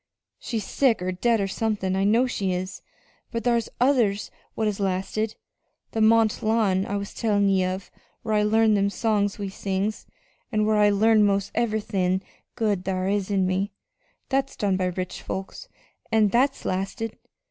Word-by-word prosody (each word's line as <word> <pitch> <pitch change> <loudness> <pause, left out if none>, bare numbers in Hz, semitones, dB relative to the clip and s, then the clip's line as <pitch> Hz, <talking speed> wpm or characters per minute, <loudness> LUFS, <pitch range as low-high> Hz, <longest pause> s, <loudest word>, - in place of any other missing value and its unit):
She's 225 -3 -3
sick 260 -5 +2
or 180 +1 -2
dead, 225 +5 +1
or 195 - 0
somethin' 200 -2 -1
I 195 +1 +1
know 230 +5 +4
she 195 -7 -1
is. 185 +1 -4 0.5
But 230 -1 -3
thar's 235 -1 +1
others 240 -6 +2 0.2
what 220 - 0
has 210 -1 -1
lasted. 195 +3 -1 0.6
That 220 - -1
Mont 220 0 +4
Lawn 215 -4 +1
I 205 - -1
was 200 0 -6
tellin' 205 -3 +1
ye 190 -1 +3
of, 185 +1 -4 0.3
whar 220 - -1
I 210 - +3
learned 220 +1 +3
them 200 0 +2
songs 205 -2 0
we 200 -1 -4
sings, 195 +2 -3 0.4
an' 215 -2 +1
whar 215 0 +2
I 210 0 +5
learned 215 +1 +4
'most 200 0 0
ev'rythin' 200 -5 0 0.3
good 210 -6 0
thar 185 -1 -1
is 200 -1 0
in 195 -2 +2
me 190 +2 -1 0.6
that's 270 0 0
done 200 -2 0
by 185 0 0
rich 180 0 -4
folks, 195 - -6 0.4
an' 220 -2 +4
that's 265 +6 +1
lasted! 195 +4 -3
205 Hz, 170 wpm, -25 LUFS, 190-225 Hz, 0.6 s, I